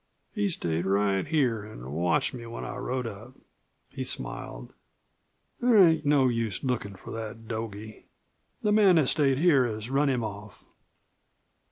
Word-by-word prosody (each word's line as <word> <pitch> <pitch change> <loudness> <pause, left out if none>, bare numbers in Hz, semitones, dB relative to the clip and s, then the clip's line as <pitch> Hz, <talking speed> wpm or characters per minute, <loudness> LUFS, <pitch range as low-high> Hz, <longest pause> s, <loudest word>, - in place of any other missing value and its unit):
He 205 -2 0
stayed 85 - -1
right 100 +1 +1
here 130 -9 +1
an' 65 - -10
watched 85 - +1
me 120 -2 -8
when 115 - -7
I - - -6
rode 125 0 -3
up." 110 +3 -8 0.6
He - - -5
smiled. - - -2 0.9
"There 245 -2 +4
ain't 165 -6 +5
no 140 -3 +4
use 115 -5 -2
lookin' 115 -6 -2
for - - -11
that 115 0 -7
dogie. 110 -1 -7 0.6
The 210 - +2
man 205 -4 +5
that 155 -5 +3
stayed 140 -4 +2
here 150 -4 +4
has 110 +2 -6
run 140 +1 +2
him 125 -3 0
off." 105 -1 -8
115 Hz, 155 wpm, -27 LUFS, 105-145 Hz, 0.9 s, ain't